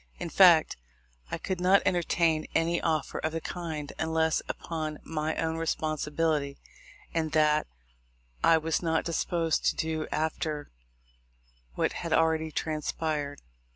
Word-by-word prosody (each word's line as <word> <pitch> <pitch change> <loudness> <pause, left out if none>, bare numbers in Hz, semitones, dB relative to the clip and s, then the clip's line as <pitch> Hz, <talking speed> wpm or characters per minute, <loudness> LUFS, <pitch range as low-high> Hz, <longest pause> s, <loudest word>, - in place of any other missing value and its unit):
In 170 - -5
fact, 175 -5 +6 0.5
I - - -2
could 185 -2 -3
not 190 +2 +5
entertain 165 -2 +1
any 170 +1 +2
offer 155 -3 -1
of 155 0 -2
the 165 - -1
kind, 160 -4 -5
unless 160 0 +1
upon 155 -2 -4
my 155 0 -2
own 160 0 -1
responsibility; 155 -2 -1 0.6
and 160 -2 -1
that 150 -1 +3 0.8
I 165 - +6
was 160 0 -1
not 160 -2 0
disposed 165 -1 0
to - - +3
do 160 -1 -2
after 155 -1 -2 1.0
what - - 0
had - - -3
already 160 -1 +2
trans 155 -1 -2
pired. 145 -3 -3
160 Hz, 130 wpm, -29 LUFS, 155-165 Hz, 1.0 s, fact